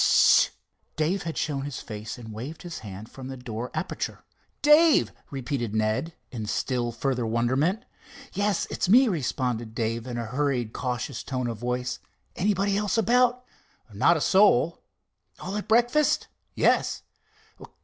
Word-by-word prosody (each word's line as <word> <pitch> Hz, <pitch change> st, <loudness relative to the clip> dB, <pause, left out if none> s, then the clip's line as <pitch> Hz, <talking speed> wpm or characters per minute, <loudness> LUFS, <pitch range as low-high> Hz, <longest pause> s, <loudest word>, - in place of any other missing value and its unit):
"S—st!" -, -, +6 dB, 0.4 s
Dave 165 Hz, +6 st, 0 dB
had 160 Hz, -, -6 dB
shown 145 Hz, -3 st, -1 dB
his 145 Hz, -2 st, -5 dB
face 105 Hz, +1 st, -7 dB
and 110 Hz, -3 st, -9 dB
waved 135 Hz, -, -7 dB
his 175 Hz, -2 st, -6 dB
hand 105 Hz, +1 st, -9 dB
from 130 Hz, -1 st, -9 dB
the 135 Hz, 0 st, -6 dB
door 125 Hz, 0 st, -5 dB
aperture. -, -, -4 dB, 0.4 s
"Dave!" 305 Hz, +1 st, +6 dB, 0.2 s
repeated 130 Hz, -5 st, -3 dB
Ned, 110 Hz, +9 st, 0 dB, 0.2 s
in 110 Hz, -4 st, -5 dB
still 120 Hz, +2 st, -1 dB
further 125 Hz, +1 st, -1 dB
wonderment. 130 Hz, -, +1 dB, 0.5 s
"Yes, 205 Hz, 0 st, 0 dB
it's 180 Hz, -, -1 dB
me," 250 Hz, +6 st, +7 dB
responded 125 Hz, -, -2 dB
Dave 115 Hz, +1 st, -2 dB
in 120 Hz, -1 st, -4 dB
a 120 Hz, -, -3 dB
hurried, 125 Hz, -2 st, -1 dB
cautious 125 Hz, -1 st, -3 dB
tone 130 Hz, -2 st, -3 dB
of 115 Hz, -3 st, -4 dB
voice. 125 Hz, +1 st, -2 dB, 0.4 s
"Anybody 200 Hz, +1 st, +1 dB
else 210 Hz, +2 st, 0 dB
about?" 250 Hz, +2 st, +3 dB, 0.5 s
"Not 165 Hz, +12 st, +4 dB
a -, -, -3 dB
soul." 170 Hz, -5 st, +4 dB, 0.6 s
"All 190 Hz, +2 st, -5 dB
at 210 Hz, -, -4 dB
breakfast?" 240 Hz, +6 st, +3 dB, 0.3 s
"Yes." -, -, +2 dB
130 Hz, 145 wpm, -26 LUFS, 120-190 Hz, 0.6 s, me